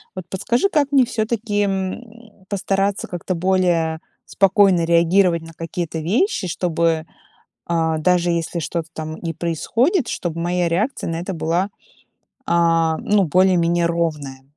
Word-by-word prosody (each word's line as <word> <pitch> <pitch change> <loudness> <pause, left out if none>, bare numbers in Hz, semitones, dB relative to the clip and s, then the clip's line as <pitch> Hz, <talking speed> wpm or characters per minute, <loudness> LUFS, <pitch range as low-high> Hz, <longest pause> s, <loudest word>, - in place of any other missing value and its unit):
Вот 185 -2 -6
подскажи, 235 - 0
как 290 -5 +1
мне 270 -3 +5
всё-таки, 220 -2 -1
м, 205 +2 -5
постараться 195 0 -1
как-то 180 +1 -4
более 175 -3 +1 0.3
спокойно 195 -3 +3
реагировать 170 +1 +3
на 165 0 -11
какие-то 165 0 -4
вещи, 205 - 0
чтобы, 165 -2 0 0.6
а, 160 -2 0
даже 175 +2 +2
если 170 0 -2
что-то 165 +1 -3
там 155 -1 -6
и 165 0 -4
происходит, 230 - 0
чтоб 170 -2 -3
моя 175 +1 0
реакция 195 +6 -1
на 165 - -2
это 185 +3 -4
была, 170 +4 -1 0.8
а, 165 -1 +2
ну, 205 -1 +2
более-менее 175 0 +3
ровная. 150 -6 -2
175 Hz, 130 wpm, -20 LUFS, 165-200 Hz, 0.8 s, мне